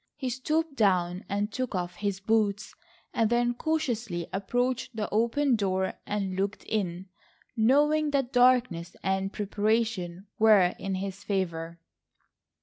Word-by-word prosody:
He 260 -3 -3
stooped 305 +4 -1
down 185 -5 +1
and 205 +2 -1
took 255 -2 -3
off 180 -1 -3
his 200 -2 -2
boots, 210 0 0 0.4
and 225 -2 +2
then 240 0 +2
cautiously 240 - -2
approached 245 +5 -1
the 215 -2 -2
open 235 +5 +2
door 190 -3 0
and 195 -2 -2
looked 195 +2 -2
in, 185 -4 -2 0.5
knowing 295 +6 +3
that 275 -3 -1
darkness 245 -9 +3
and 190 0 0
preparation 205 -3 -1
were 210 -5 +6
in 195 -1 -2
his 195 +1 -5
favour. 170 -4 -2
210 Hz, 130 wpm, -28 LUFS, 190-245 Hz, 0.5 s, were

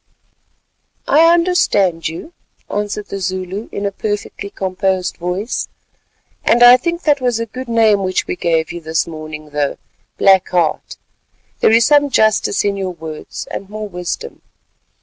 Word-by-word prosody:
"I 325 +3 +6
understand 335 - +2
you," 170 - -8 0.4
answered 205 0 -3
the 195 - -4
Zulu, 185 +2 -4
in 200 - -4
a 200 - 0
perfectly 205 0 -4
composed 190 -1 -2
voice, 180 +6 -3 0.8
"and 240 +1 +4
I 245 +1 +10
think 340 +6 -2
that 290 -3 +2
was 245 -2 0
a 230 - -2
good 255 +3 -8
name 220 -3 +3
which 185 -1 -1
we - - -3
gave 165 -2 0
you 175 0 -7
this 160 0 -1
morning, 155 -2 -9
though, 145 -1 -1 0.4
Black 190 -2 +4
Heart, 170 -4 -1 0.6
there - - +4
is 225 +1 +5
some 290 +1 +4
justice 215 -4 +2
in 200 -1 0
your 185 -2 -4
words 160 -2 -8
and 195 - -6
more 215 0 -5
wisdom. 180 - -6
200 Hz, 150 wpm, -17 LUFS, 180-230 Hz, 0.8 s, I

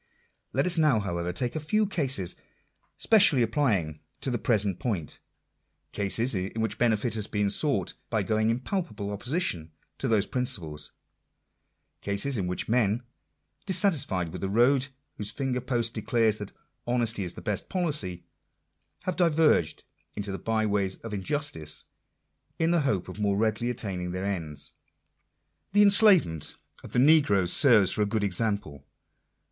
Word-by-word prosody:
Let 135 - +1
us 180 -2 +1
now, 150 -8 +4
however, 85 -3 -3
take 120 - -3
a - - -1
few 215 +8 +1
cases 135 - -1 0.6
specially 195 - +5
applying 105 - 0 0.2
to 135 - -2
the 120 - -1
present 100 -6 +1
point 100 - -3 0.4
— - - -49 0.3
cases 115 +5 +1
in 95 +3 -3
which 110 -1 -2
benefit 115 -1 +1
has 110 -2 -2
been 105 -1 0
sought 145 +6 -1 0.2
by 110 -3 0
going 110 +2 +1
in 115 +2 0
palpable 150 - -3
opposition 100 - -3 0.3
to - - -2
those 110 -3 +2
principles 80 -12 -3 0.5
— - - -50
cases 100 +7 -1
in 95 -5 -1
which 90 - -3
men, 115 0 +1 0.6
dissatisfied 150 - +1
with - - -8
the 95 - -2
road 125 +6 +3 0.3
whose 105 -1 -3
finger 125 +3 -2
post 120 -3 -1
declares 110 -1 +1
that 105 - -7 0.2
" - - -47
Honesty 115 -4 0
is 90 -1 -3
the - - -9
best 105 -3 -3
policy," 150 - -1 0.8
have 185 - -2
diverged 160 - +2 0.3
into 100 -1 -4
the 95 - -5
by 110 -1 0
ways 100 -2 0
of 115 -2 -7
injustice, 100 - -3 0.7
in 165 +1 +1
the 170 -2 +3
hope 110 -11 -1
of - - -8
more 100 -1 +1
readily 110 +2 0
attaining 95 -7 -3
their 95 +1 -3
ends. 80 -7 -4 1.0
The 205 0 +6
enslavement 200 - +5 0.3
of - - -11
the - - 0
negroes 125 - +4
serves 115 -9 +5
for - - +1
a 105 - +2
good 110 0 -1
example. 100 - -1
110 Hz, 155 wpm, -27 LUFS, 95-135 Hz, 1.0 s, The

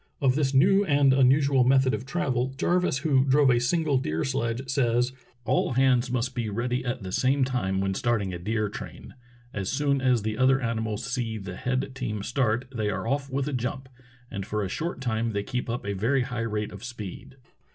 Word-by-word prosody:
Of 135 -3 +3
this 140 -1 +1
new 190 +9 +5
and 145 -6 +4
unusual 135 0 +4
method 130 +1 +4
of 130 - -4
travel, 130 -5 -1
Jarvis, 180 -2 +1
who 135 -2 +2
drove 135 0 +4
a 120 - +3
single 145 +2 +1
deer 80 -10 -2
sledge, 130 -1 -2
says: 125 -2 +1 0.3
"All 180 0 +1
hands 130 -1 +3
must 125 +1 -1
be 120 -3 -2
ready 125 +4 -2
at 125 -3 -3
the 95 - -6
same 135 +6 +2
time 110 -8 -1
when 95 0 0
starting 105 -4 0
a 85 - -5
deer 105 +4 -1
train. 100 - -9 0.4
As 95 -2 -3
soon 140 -1 +1
as 125 -4 +2
the 110 +2 -3
other 135 +1 +4
animals 110 -2 -2
see 120 -3 -2
the 95 -3 -7
head 125 +5 -2
team 110 -6 -4
start 120 0 0
they 110 -2 0
are 105 - -3
off 140 +2 -1
with 135 +1 -2
a 150 - -3
jump, 130 +1 -3 0.4
and 100 - -4
for 105 +2 -2
a - - -2
short 160 - -4
time 115 -2 -1
the}' 100 0 -1
keep 125 +2 -4
up 120 -1 -3
a 100 - -2
very 120 +7 +1
high 125 -2 -5
rate 105 0 -3
of 100 -1 -10
speed. 120 0 -8
125 Hz, 205 wpm, -26 LUFS, 110-135 Hz, 0.4 s, new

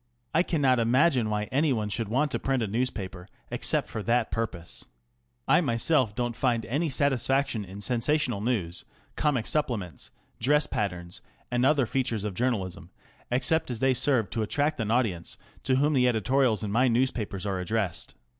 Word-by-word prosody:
I 165 - +4
cannot 140 -8 +2
imagine 125 0 +3
why 105 0 0
anyone 130 -6 +1
should 110 +1 -3
want 145 +6 +1
to - - -1
print 135 -3 0
a - - -1
newspaper 100 -5 -3 0.2
except - - +1
for 110 - -5
that 115 +2 +1
purpose. 95 -7 -4 0.6
I - - +5
myself 115 -1 +1
don't 120 -1 -2
find 120 -3 0
any 150 +6 -1
satisfaction 135 -3 +1
in 100 +1 -9
sensational 120 +1 0
news, 105 -8 -2 0.3
comic 135 -7 +1
supplements, 115 - -2 0.3
dress 145 +5 +3
patterns, 90 -4 -4 0.3
and 125 0 +1
other 135 -1 +4
features 120 -4 -1
of 105 -2 -3
journalism, 100 -5 -2 0.4
except 130 +6 +1
as 120 -3 -4
they 130 +1 +3
serve 125 -5 +1
to 115 - -1
attract 145 +7 0
an 110 - -2
audience 110 -8 0 0.3
to 130 - +3
whom 145 +3 +2
the 125 -2 +4
editorials 120 0 +2
in 105 - -3
my 125 +5 +3
newspapers 115 -5 0
are 95 -2 -1
addressed. 95 - -2
120 Hz, 165 wpm, -27 LUFS, 105-135 Hz, 0.6 s, I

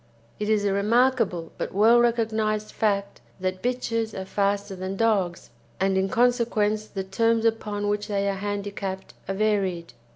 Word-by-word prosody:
It 210 0 -2
is 210 -2 +2
a 200 - +2
remarkable 215 -4 +2
but - - -4
well 225 +4 +6
recognised 220 -3 +1
fact 200 -2 -1 0.2
that 185 0 -2
bitches 230 -4 -1
are 190 - -5
faster 200 0 -1
than 185 +1 -4
dogs, 195 - 0 0.3
and 195 0 +2
in 190 0 +1
consequence 225 -3 +1
the 195 -2 -4
terms 225 +4 +1
upon 210 -2 0
which 205 0 -1
they 200 -2 0
are 200 - +1
handicapped 200 -1 -4
are 195 - -2
varied. 190 -6 0
205 Hz, 155 wpm, -25 LUFS, 195-225 Hz, 0.3 s, well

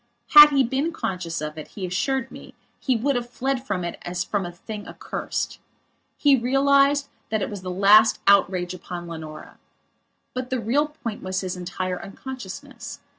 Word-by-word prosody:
Had 295 0 +11
he 275 -2 +3
been 270 +6 -1
conscious 180 - -4
of 155 +1 -5
it, 155 - -8
he 195 - -6
assured 265 +9 -1
me, - - -12 0.2
he 260 - +1
would 265 +5 0
have 240 0 -3
fled 260 +1 -2
from 195 -7 -2
it 170 - -5
as 175 0 -3
from 195 0 -2
a - - -7
thing 205 +4 -8
accursed. - - -4 0.6
He 285 -2 +5
realized 275 +3 +3 0.2
that 215 -2 0
it - - -4
was 205 -2 -6
the 185 - -6
last 205 +4 +5
outrage 185 -2 +3
upon 175 -1 -7
Leonora. 160 -2 -9 0.7
But 255 0 -4
the 260 - -1
real 270 +7 +1
point 240 -8 -7
was 185 0 -2
his 185 -1 -4
entire 180 0 -4
unconsciousness. 255 +3 -8
215 Hz, 175 wpm, -24 LUFS, 180-265 Hz, 0.7 s, Had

